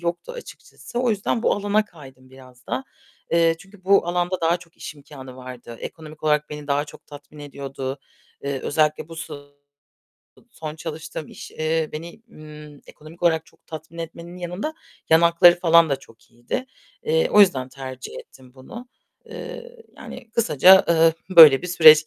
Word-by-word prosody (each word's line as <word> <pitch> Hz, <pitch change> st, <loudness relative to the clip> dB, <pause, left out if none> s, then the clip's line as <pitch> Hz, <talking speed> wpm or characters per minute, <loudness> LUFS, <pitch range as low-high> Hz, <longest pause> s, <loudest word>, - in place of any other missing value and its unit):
yoktu 175 Hz, -, -4 dB
açıkçası. 475 Hz, -, -9 dB
O 245 Hz, -2 st, +1 dB
yüzden 215 Hz, +3 st, -1 dB
bu -, -, +3 dB
alana 205 Hz, +1 st, +1 dB
kaydım 135 Hz, -8 st, -16 dB
biraz 130 Hz, -1 st, -17 dB
da. 270 Hz, -, -3 dB, 0.5 s
Eee, 165 Hz, -1 st, +3 dB
çünkü 195 Hz, +1 st, -18 dB
bu 195 Hz, -3 st, +4 dB
alanda 175 Hz, +1 st, -1 dB
daha 165 Hz, +1 st, +2 dB
çok 170 Hz, -1 st, -19 dB
iş -, -, -8 dB
imkânı 140 Hz, -3 st, -12 dB
vardı. 125 Hz, -2 st, -10 dB
Ekonomik 155 Hz, -1 st, -10 dB
olarak 150 Hz, -1 st, +1 dB
beni 150 Hz, -1 st, -8 dB
daha 145 Hz, +1 st, 0 dB
çok 150 Hz, -, -15 dB
tatmin 145 Hz, +1 st, -13 dB
ediyordu. 135 Hz, -1 st, -6 dB, 0.5 s
Eee, 140 Hz, -1 st, -3 dB
özellikle 155 Hz, +1 st, 0 dB
bu 165 Hz, -, -10 dB, 1.3 s
son 155 Hz, -1 st, -7 dB
çalıştığım 160 Hz, -1 st, -7 dB
iş, -, -, -11 dB
eee, 160 Hz, 0 st, -1 dB
beni, 170 Hz, +8 st, -8 dB
ımm, 150 Hz, -3 st, -13 dB
ekonomik 155 Hz, +3 st, -15 dB
olarak 160 Hz, -2 st, +2 dB
çok -, -, -26 dB
tatmin 160 Hz, +1 st, -10 dB
etmenin 170 Hz, +1 st, -8 dB
yanında 180 Hz, -, -5 dB, 0.4 s
yan 160 Hz, +1 st, +6 dB
hakları 170 Hz, +1 st, +6 dB
falan 165 Hz, -2 st, +5 dB
da 140 Hz, -, +1 dB
çok 115 Hz, -3 st, -21 dB
iyiydi. 120 Hz, -, -5 dB, 0.4 s
Eee, 485 Hz, +1 st, +1 dB
o -, -, +6 dB
yüzden 135 Hz, -10 st, +4 dB
tercih 130 Hz, -1 st, -9 dB
ettim 130 Hz, -1 st, -16 dB
bunu. 235 Hz, -, -11 dB, 0.4 s
Eee, 485 Hz, 0 st, -9 dB, 0.2 s
yani 230 Hz, -, -11 dB
kısaca, 190 Hz, -, +6 dB
eee, 165 Hz, -1 st, +5 dB, 0.2 s
böyle 155 Hz, -4 st, +10 dB
bir -, -, -4 dB
süreç 155 Hz, -3 st, +7 dB
160 Hz, 160 wpm, -22 LUFS, 145-180 Hz, 1.3 s, böyle